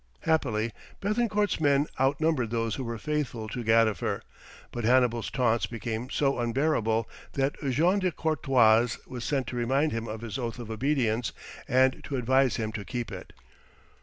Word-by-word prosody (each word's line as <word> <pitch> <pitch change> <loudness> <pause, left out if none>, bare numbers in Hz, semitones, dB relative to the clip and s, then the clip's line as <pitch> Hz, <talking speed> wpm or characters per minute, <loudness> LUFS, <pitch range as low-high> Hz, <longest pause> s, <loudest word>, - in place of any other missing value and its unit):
Happily, 115 -8 +1 0.3
Béthencourt's 210 0 0
men 145 -1 +4
outnumbered 135 -2 +1
those 115 -1 -1
who 130 - -3
were 115 -1 -4
faithful 135 -4 -2
to 120 +2 -4
Gadifer, 110 -4 +2 0.5
but 120 - -4
Hannibal's 120 -1 +3
taunts 120 -3 +1
became 115 +1 -4
so 140 -2 +1
unbearable 115 -3 +1 0.3
that 135 +1 +1 0.2
Jean 170 +10 +3
de 185 -2 +1
Courtois 125 -8 +3
was 125 -2 -7
sent 135 -1 0
to - - -6
remind 135 +6 +1
him 115 0 -3
of 110 0 -6
his 115 0 -5
oath 120 -1 -3
of 115 -2 -7
obedience 120 -2 0 0.3
and 130 +1 +3
to 140 - -4
advise 130 +1 +3
him 110 -2 -2
to 105 -1 -5
keep 120 +3 -4
it. - - -8
125 Hz, 160 wpm, -28 LUFS, 115-140 Hz, 0.5 s, men